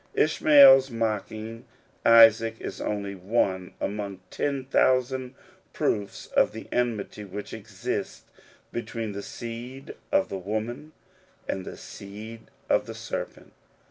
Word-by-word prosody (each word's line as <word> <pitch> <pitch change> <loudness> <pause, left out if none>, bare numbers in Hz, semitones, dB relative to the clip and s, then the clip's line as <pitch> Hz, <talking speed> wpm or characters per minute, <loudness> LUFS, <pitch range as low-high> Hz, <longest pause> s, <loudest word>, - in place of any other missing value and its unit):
Ishmael's 140 -3 +7
mocking 115 0 -3 0.4
Isaac 115 -1 +7
is - - -6
only 100 -1 -3
one 95 -1 -1
among 100 -2 -4
ten 140 -2 -2
thousand 130 0 +1 0.4
proofs 100 -1 -1
of - - +2
the 110 - -8
enmity 115 -3 -1
which 100 +1 -7
exists - - -5 0.5
be 120 - -2
tween 115 -2 -5
the 100 0 -5
seed 120 +6 -7 0.2
of 195 - +2
the 95 - -4
woman 110 +10 -4 0.5
and 95 -1 -3
the - - -8
seed 110 +3 -10 0.2
of - - +2
the - - -7
serpent. - - -6
115 Hz, 120 wpm, -26 LUFS, 105-125 Hz, 0.5 s, Ishmael's